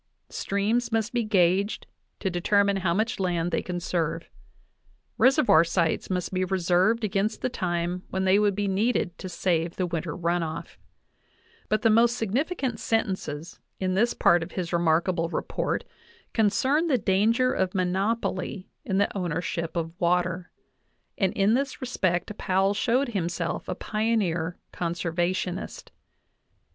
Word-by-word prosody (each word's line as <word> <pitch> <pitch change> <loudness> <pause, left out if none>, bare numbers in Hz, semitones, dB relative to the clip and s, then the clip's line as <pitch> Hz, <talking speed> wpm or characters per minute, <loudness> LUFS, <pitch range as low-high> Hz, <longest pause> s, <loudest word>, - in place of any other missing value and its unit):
Streams 215 +5 -1
must 225 0 0
be 240 -1 +1
gauged 195 -1 +2 0.4
to 190 - 0
determine 200 +3 +2
how 180 -3 0
much 220 +6 0
land 175 -2 0
they 165 - 0
can 180 -1 -4
serve; 170 -2 -2 0.9
reservoir 260 - +5
sites 170 -1 0
must 180 0 -2
be 185 0 +1
reserved 185 +4 +2
against 210 +1 -1
the 255 - +1
time 175 -4 -2
when 190 0 -1
thejcA 190 +2 +4
will 210 - +4
be 200 +1 -1
needed 195 -2 0
to 185 - -6
save 170 -1 0
the 185 - 0
winter 170 -2 -3
run 175 0 0
ofLjlBut 165 +5 -7
the 225 - +5
most 235 +2 +4
sig 220 -5 -2
nificant 265 - -1
sentences 185 -8 -2 0.2
in 185 -1 0
this 230 +6 +2
part 175 0 +4
of 165 - -6
his 175 -2 -3
remarkable 170 0 +2
report - - -2 0.5
concern 260 +9 +2
the 275 -5 +3
danger 225 +5 +2
of 190 +1 -1
monopoly 190 +1 -1
in 190 - -1
the 200 +1 +1
ownership 170 -2 -2
of 165 -1 -2
water, 175 0 +1 0.7
and 190 -2 +1
in 200 +2 +3
this 270 +2 -1
respect 190 -6 -1
Powell 195 +1 +2
showed 240 +5 +1
himself 175 -6 -3
a 180 - -1
pioneer 195 -7 -1 0.2
conservationist^jHe. 175 +2 -2
190 Hz, 140 wpm, -26 LUFS, 175-215 Hz, 0.9 s, reservoir